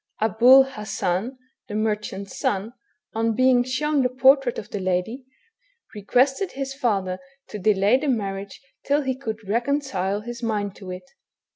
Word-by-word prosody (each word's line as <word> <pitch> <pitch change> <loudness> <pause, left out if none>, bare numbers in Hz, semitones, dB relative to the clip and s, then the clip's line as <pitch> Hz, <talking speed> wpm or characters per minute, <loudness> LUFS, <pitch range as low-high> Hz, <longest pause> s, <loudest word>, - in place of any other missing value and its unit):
Abul 235 +5 +6
Hassan, 215 -2 -3 0.3
the 205 - -6
merchant's 210 -2 -3
son, 205 +4 -1 0.4
on 225 0 0
being 255 0 +4
shown 285 +3 0
the 250 - +2
por 260 +2 +6
trait 270 -4 -4
of 210 - -7
the 205 - -3
lady, 185 +8 -2 0.7
requested 260 - +1
his 270 0 -4
father 200 -9 -1 0.3
to 210 - -6
delay 205 +3 +3
the 295 +2 -3
marriage 200 -5 -3 0.2
till 285 +1 +1
he 260 -1 -1
could 225 -5 -6
reconcile 220 -4 -1
his 240 +2 -7
mind 210 -4 -2
to 190 -2 -10
it. 180 0 -8
225 Hz, 150 wpm, -23 LUFS, 200-260 Hz, 0.7 s, Abul